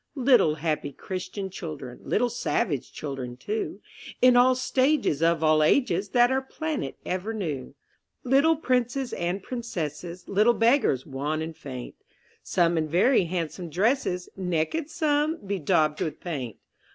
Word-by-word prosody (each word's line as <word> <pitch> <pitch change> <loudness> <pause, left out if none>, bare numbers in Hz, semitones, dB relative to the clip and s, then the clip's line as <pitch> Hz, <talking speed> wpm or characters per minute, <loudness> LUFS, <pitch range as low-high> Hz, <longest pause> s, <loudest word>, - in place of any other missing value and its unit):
Little 245 - +4
happy 150 -2 -2
Christian 190 +3 -5
children, 155 -8 -7
Little 240 +2 0
savage 210 - -1
children 130 -4 -6
too, 210 - -4 0.4
In 255 -1 +6
all 250 +1 +6
stages 255 - +1
of 165 -1 +2
all 155 0 +4
ages, 195 - +2
That 245 +3 +4
our 265 0 +1
planet 310 +3 -4
ever 185 +5 -3
knew; 150 -10 -4 0.5
Little 275 +6 +4
princes 255 -2 0
and 180 +3 -2
princesses, 175 - -5
Little 215 +4 +3
beggars, 230 - +3
wan 145 +3 -3
and 160 0 -6
faint— 130 -4 -9 0.4
Some 170 -2 +2
in 155 - -1
very 185 - +3
handsome 170 0 -4
dresses, 185 - 0
Naked 185 - -1
some, 310 -1 +1
bedaubed 155 -5 +1
with 155 - -3
paint. 135 - -5
185 Hz, 135 wpm, -26 LUFS, 155-250 Hz, 0.5 s, In